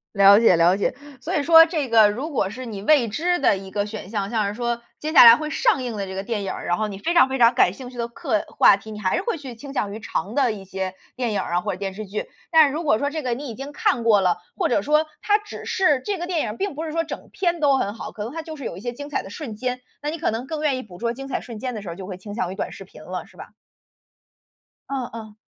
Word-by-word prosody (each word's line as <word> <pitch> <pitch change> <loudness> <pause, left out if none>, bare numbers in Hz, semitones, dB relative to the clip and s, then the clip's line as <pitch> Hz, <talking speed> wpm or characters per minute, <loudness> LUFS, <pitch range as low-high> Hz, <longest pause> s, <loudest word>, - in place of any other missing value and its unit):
了 200 +1 +8
解 225 -6 +5
了 175 +3 +4
解， - - 0 0.3
所 - - -3
以 295 - +2
说 325 +2 +8
这 310 -6 -2
个 220 -2 +7
如 260 +9 -4
果 200 -10 -1
是 255 +3 -7
你 200 -3 -6
未 280 -2 +4
知 345 +11 0
的 235 - +3
一 190 0 -10
个 205 0 -1
选 210 -2 -8
项， 200 -3 -2
像 215 -3 0
是 200 - -3
说 235 0 -2 0.2
接 310 - -3
下 295 - +9
来 230 0 +11
会 305 +2 -4
上 430 - +2
映 240 -4 -4
的 200 - -2
这 190 - -7
个 190 - -3
电 215 -2 -3
影 195 - -3
儿， - - -7
然 175 - +1
后 215 - -1
你 200 -1 -7
非 340 +8 -1
常 340 - +7
非 265 0 -3
常 235 0 +5
感 185 -7 +4
兴 255 +2 -9
趣 250 - -13
的 235 -1 -2
课 235 -2 -2
话 195 - +5
题， 220 +2 -11
你 210 - -7
还 185 -2 0
是 370 - -2
会 455 -8 -2
去 260 -5 -8
倾 275 +4 -10
向 200 -6 -1
于 215 - -6
长 210 0 -4
的 265 -5 +3
一 200 -3 -8
些 190 -1 -4 0.2
电 245 -4 -2
影 205 - 0
儿 175 - -3
啊 175 - +2
或， 205 - -2
者 185 - -6
电 195 -1 -4
视 215 0 -6
剧。 200 +2 -5 0.2
但 320 -2 +7
是 275 - -3
如 335 - -3
果 215 -8 +2
说 285 - 0
这 310 0 -4
个 250 -2 0
你 275 +1 -6
已 225 - -7
经 275 +2 -7
看 250 -4 0
过 215 -3 +5
了， 180 -2 +2 0.2
或 - - 0
者 205 - +1
说， 305 +2 +2 0.2
它 415 0 +3
只 420 - -10
是 300 -8 +2
这 400 -4 -2
个 350 - -4
电 345 -4 0
影 - - -2
儿 220 - -9
并 395 -7 -2
不 315 - -4
是 315 - -5
说 330 +1 0
整 320 - -8
篇 350 -4 0
都 280 -3 +4
很 200 +2 -2
好， - - -7
可 210 - -6
能 225 - -5
它 325 +2 -6
就 315 -1 -8
是 280 - -8
有 175 - -5
一 - - -9
些 240 +1 -4
精 285 +4 -8
彩 295 - -2
的 195 - -10
瞬 225 -2 -6
间， 250 +2 -3 0.2
那 295 +1 -3
你 330 - -6
可 - - +1
能 225 +3 -3
更 305 +2 -4
愿 285 -4 +1
意 255 - -5
捕 180 -4 -13
捉 235 +2 -1
精 270 +2 -8
彩 275 - -2
瞬 235 -3 -9
间 250 +3 -4
的 215 - -5
时 190 - -8
候 165 - -6
就 190 +1 -8
会 185 -2 -7
倾 205 +2 -9
向 185 -5 -2
于 190 - -6
短 - - -4
视 - - -9
频 - - -15
了， - - -6
是 - - -21
吧？ - - -10 1.4
哦 270 -2 -2
哦。 220 -2 -9
235 Hz, 340 characters per minute, -23 LUFS, 205-295 Hz, 1.4 s, 来